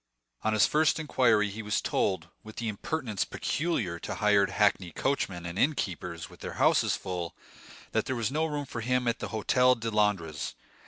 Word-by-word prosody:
On 110 Hz, -, +1 dB
his 105 Hz, -2 st, +5 dB
first 155 Hz, +1 st, +3 dB
inquiry 115 Hz, -9 st, +3 dB
he 110 Hz, +3 st, -6 dB
was 105 Hz, 0 st, 0 dB
told, 90 Hz, -3 st, 0 dB
with 110 Hz, 0 st, -11 dB
the 115 Hz, -, -3 dB
impertinence 110 Hz, 0 st, -2 dB
peculiar 115 Hz, -, -2 dB
to -, -, -5 dB
hired 105 Hz, -1 st, +3 dB
hackney 100 Hz, -4 st, +2 dB
coachmen 95 Hz, -, -1 dB
and 85 Hz, +3 st, -4 dB
innkeepers 90 Hz, -, -1 dB
with -, -, -16 dB
their -, -, -6 dB
houses -, -, +3 dB
full, 90 Hz, -2 st, -4 dB, 0.6 s
that -, -, +1 dB
there 130 Hz, -, -1 dB
was 115 Hz, 0 st, -1 dB
no 155 Hz, +3 st, +1 dB
room 145 Hz, -2 st, -3 dB
for 120 Hz, -3 st, -5 dB
him 125 Hz, +1 st, +1 dB
at 120 Hz, -, 0 dB
the -, -, -3 dB
Hôtel 125 Hz, +3 st, +3 dB
de 115 Hz, 0 st, -2 dB
Londres. 95 Hz, -8 st, 0 dB
110 Hz, 180 wpm, -29 LUFS, 95-125 Hz, 0.6 s, his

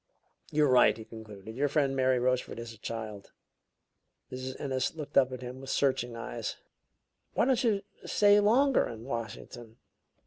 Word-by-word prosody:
"You're 150 Hz, 0 st, +3 dB
right," 125 Hz, -3 st, +5 dB
he 110 Hz, -, -9 dB
concluded; 110 Hz, -2 st, -10 dB
"your 145 Hz, +3 st, +1 dB
friend 140 Hz, -1 st, +1 dB
Mary 130 Hz, -1 st, +3 dB
Rochefort 125 Hz, 0 st, 0 dB
is 115 Hz, -1 st, -7 dB
a 110 Hz, -, -17 dB
child." 110 Hz, -3 st, -6 dB, 1.0 s
Mrs. 130 Hz, 0 st, -6 dB
Ennis 130 Hz, 0 st, -1 dB
looked 150 Hz, -3 st, -7 dB
up 130 Hz, -1 st, +5 dB
at 130 Hz, 0 st, -6 dB
him 125 Hz, +1 st, -7 dB
with 135 Hz, -, -8 dB
searching 125 Hz, -4 st, +1 dB
eyes. 115 Hz, -1 st, -5 dB, 0.8 s
"Why -, -, +2 dB
don't 260 Hz, -1 st, +2 dB
you 210 Hz, -4 st, +2 dB, 0.2 s
stay 205 Hz, 0 st, +5 dB
longer 250 Hz, +6 st, +4 dB
in 115 Hz, -1 st, -8 dB
Washington?" 115 Hz, -1 st, -6 dB
130 Hz, 160 wpm, -30 LUFS, 115-145 Hz, 1.0 s, right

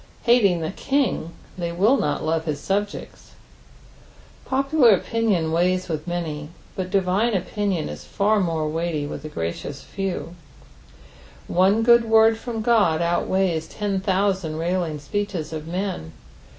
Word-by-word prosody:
Hating 205 Hz, -8 st, +4 dB
the 160 Hz, -, -2 dB
King 270 Hz, -, -1 dB, 0.3 s
they 170 Hz, -1 st, -2 dB
will 200 Hz, +10 st, +3 dB
not 150 Hz, -, -1 dB
love 160 Hz, 0 st, 0 dB
his 150 Hz, -3 st, -2 dB
subjects. 205 Hz, +1 st, -4 dB, 1.1 s
Popular 270 Hz, -4 st, +4 dB
opinion 195 Hz, -6 st, 0 dB
weighs 180 Hz, +2 st, +1 dB
with 155 Hz, -1 st, -4 dB
many, 155 Hz, -4 st, -4 dB, 0.3 s
but 185 Hz, -1 st, -3 dB
divine 195 Hz, +4 st, +1 dB
opinion 190 Hz, -2 st, -1 dB
is -, -, -8 dB
far 210 Hz, +1 st, +1 dB
more 165 Hz, -4 st, 0 dB
weighty 160 Hz, -1 st, -2 dB
with 145 Hz, -, -6 dB
the 155 Hz, -, -7 dB
gracious 85 Hz, -, -5 dB
few. 190 Hz, -3 st, -4 dB, 1.1 s
One 195 Hz, +5 st, +3 dB
good 235 Hz, 0 st, +6 dB
word 225 Hz, 0 st, +5 dB
from 225 Hz, -2 st, -4 dB
God 210 Hz, -9 st, +3 dB
outweighs 175 Hz, -1 st, 0 dB
ten 200 Hz, +1 st, -2 dB
thousand 190 Hz, -4 st, 0 dB
railing 170 Hz, -1 st, -1 dB
speecnes 175 Hz, +2 st, -4 dB
of 155 Hz, 0 st, -6 dB
men. 180 Hz, -, -3 dB
185 Hz, 135 wpm, -23 LUFS, 160-210 Hz, 1.1 s, good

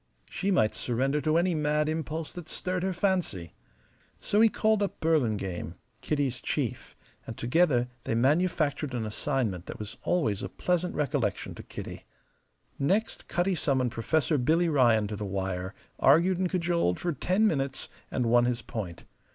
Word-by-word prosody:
She 195 Hz, -, -1 dB
might 110 Hz, -, +3 dB
surrender 135 Hz, +5 st, 0 dB
to 155 Hz, +1 st, +2 dB
any 175 Hz, +1 st, +2 dB
mad 150 Hz, -1 st, +1 dB
impulse 160 Hz, 0 st, -3 dB
that 175 Hz, -3 st, -8 dB
stirred 185 Hz, -1 st, -1 dB
her 190 Hz, +1 st, 0 dB
fancy. 180 Hz, -, -1 dB, 0.7 s
So 210 Hz, -, +2 dB
he 225 Hz, -, +7 dB
called 215 Hz, -1 st, +2 dB
up 200 Hz, -, -2 dB
Burlingame. 105 Hz, -, 0 dB, 0.3 s
Kitty's 140 Hz, -5 st, -1 dB
chief, -, -, -3 dB, 0.3 s
and 115 Hz, -, -6 dB
together 125 Hz, -1 st, +2 dB, 0.2 s
they -, -, 0 dB
manufactured 145 Hz, +1 st, +1 dB
an 115 Hz, -2 st, -2 dB
assignment 110 Hz, -, -2 dB
that -, -, -6 dB
was 105 Hz, -1 st, -7 dB
always 115 Hz, -, 0 dB
a -, -, -4 dB
pleasant 180 Hz, 0 st, -1 dB
recollection 140 Hz, -8 st, -1 dB
to -, -, -9 dB
Kitty. -, -, -8 dB, 0.7 s
Next, 200 Hz, +11 st, 0 dB
Cutty 180 Hz, +2 st, +1 dB
summoned 130 Hz, -7 st, +1 dB
Professor 145 Hz, +6 st, +1 dB
Billy 160 Hz, +7 st, +3 dB
Ryan 120 Hz, -7 st, +4 dB
to 105 Hz, +1 st, -4 dB
the 105 Hz, -, -5 dB
wire, 95 Hz, 0 st, -3 dB, 0.2 s
argued 170 Hz, +6 st, +4 dB
and 185 Hz, -1 st, +1 dB
cajoled 170 Hz, -, +1 dB
for 175 Hz, -2 st, -1 dB
ten 185 Hz, -, +1 dB
minutes, 140 Hz, -8 st, 0 dB, 0.2 s
and 125 Hz, -, -1 dB
won 120 Hz, +1 st, +4 dB
his 120 Hz, -1 st, -1 dB
point. 90 Hz, -7 st, -6 dB
145 Hz, 160 wpm, -28 LUFS, 115-175 Hz, 0.7 s, he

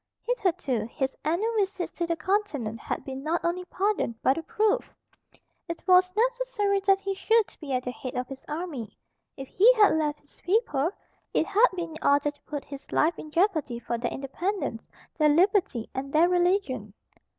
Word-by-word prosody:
Hitherto 360 Hz, -, 0 dB
his 265 Hz, +3 st, -3 dB
annual 350 Hz, +10 st, 0 dB
visits 390 Hz, -3 st, -1 dB
to 340 Hz, -, -3 dB
the 335 Hz, -, 0 dB
Continent 320 Hz, -, -1 dB
had -, -, -4 dB
been 265 Hz, 0 st, -6 dB
not 320 Hz, +4 st, 0 dB
only 360 Hz, +1 st, -1 dB
pardoned 385 Hz, -, -1 dB
but 265 Hz, -, +4 dB
approved. 425 Hz, +8 st, 0 dB, 0.8 s
It 335 Hz, -, -5 dB
was 365 Hz, 0 st, +5 dB
necessary 485 Hz, -4 st, +1 dB
that 390 Hz, 0 st, +5 dB
he 395 Hz, 0 st, -2 dB
should 445 Hz, +2 st, +2 dB
be 295 Hz, -4 st, -7 dB
at 250 Hz, 0 st, 0 dB
the 250 Hz, -, -3 dB
head 255 Hz, 0 st, -7 dB
of 250 Hz, 0 st, -2 dB
his 270 Hz, -1 st, -9 dB
army. 300 Hz, -, -5 dB, 0.4 s
If 270 Hz, -, -7 dB
he 425 Hz, -, +6 dB
had 420 Hz, -3 st, +6 dB
left 300 Hz, -2 st, 0 dB
his 290 Hz, -, -23 dB
people, 350 Hz, -, +1 dB, 0.5 s
it -, -, +3 dB
had 415 Hz, +4 st, +5 dB
been 340 Hz, -2 st, -4 dB
in -, -, -9 dB
order 285 Hz, +1 st, +3 dB
to 290 Hz, -, -30 dB
put 290 Hz, -2 st, -5 dB
his 280 Hz, -1 st, -10 dB
life 320 Hz, +1 st, +2 dB
in 310 Hz, -, -8 dB
jeopardy 315 Hz, -, +1 dB
for 235 Hz, 0 st, -3 dB
their 240 Hz, -, -1 dB
independence, 275 Hz, -, -3 dB, 0.3 s
their 305 Hz, -1 st, +5 dB
liberty, 355 Hz, -, +2 dB
and 275 Hz, +1 st, -4 dB
their 315 Hz, +4 st, +5 dB
religion. 350 Hz, -, +1 dB
335 Hz, 180 wpm, -27 LUFS, 275-395 Hz, 0.8 s, he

